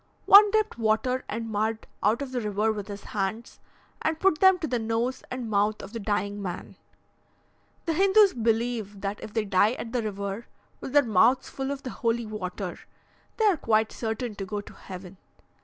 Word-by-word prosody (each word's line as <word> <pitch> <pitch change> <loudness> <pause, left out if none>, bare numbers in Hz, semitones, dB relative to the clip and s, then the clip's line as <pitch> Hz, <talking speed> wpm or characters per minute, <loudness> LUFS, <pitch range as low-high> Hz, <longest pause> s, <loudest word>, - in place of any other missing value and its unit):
One 410 +1 +9
dipped 430 - 0
water 230 +4 +1
and 230 +1 -3
mud 220 +1 -1 0.2
out 220 +7 +2
of 265 - -7
the 250 -1 -2
river 210 +1 0
with 205 -2 -5
his 200 -1 -8
hands, 210 +3 -4 0.4
and 320 0 -1
put 375 -4 +3
them 380 -1 +6
to 320 - -3
the 245 -4 -1
nose 230 +3 -1
and 250 -2 -4
mouth 210 0 +1
of 195 - -10
the 230 - -4
dying 205 -1 -2
man. 180 -2 -6 1.1
The 330 - 0
Hindoos 390 +3 +5
believe 225 -3 -1
that 200 +1 -3
if - - -8
they 220 -2 +1
die 200 +3 +3
at 235 -1 -7
the 245 - +1
river 200 +1 -4 0.3
with 265 - -7
their 290 -1 +6
mouths 230 +3 +3
full 270 0 -4
of 280 -1 -4
the 255 - -5
holy 230 0 -1
water, 195 -3 -5 0.6
they 445 - +2
are 395 -5 +4
quite 220 -4 +1
certain 225 0 -3
to 195 - -4
go 210 +1 -3
to 205 - -10
heaven. 185 0 -10
225 Hz, 190 wpm, -27 LUFS, 205-255 Hz, 1.1 s, One